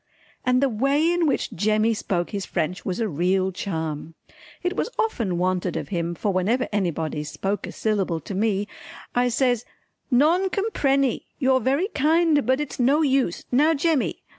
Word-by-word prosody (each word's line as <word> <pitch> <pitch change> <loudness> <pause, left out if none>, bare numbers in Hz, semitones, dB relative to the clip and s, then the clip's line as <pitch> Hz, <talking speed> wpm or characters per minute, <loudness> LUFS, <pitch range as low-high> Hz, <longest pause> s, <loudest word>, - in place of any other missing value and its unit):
And 255 +1 +2
the - - +4
way 275 +7 +2
in 345 -2 +2
which 280 - -1
Jemmy 215 +4 +2
spoke 180 -5 -2
his 200 -2 -3
French 175 +1 -2
was 185 +2 -3
a 225 - +1
real 185 +3 +1
charm. 160 -4 -4 0.5
It 360 +1 -1
was - - -1
often 230 - 0
wanted 180 0 0
of - - -5
him, 170 -3 -2
for 200 +3 -1
whenever 215 +8 +1
anybody 165 -6 -1
spoke 195 +7 -3
a - - -6
syllable 195 -6 -1
to 200 - -7
me 205 0 0 0.5
I 245 0 +2
says 245 -1 +1 0.5
"Non 320 +9 +3
comprenny, 275 - 0
you're 260 -2 +3
very 275 - +1
kind, 305 - +2
but 260 +2 +3
it's 295 -3 -5
no 280 +6 +3
use 265 - +1
Now 300 +6 +4
Jemmy!" 300 -2 0
230 Hz, 165 wpm, -24 LUFS, 185-280 Hz, 0.5 s, the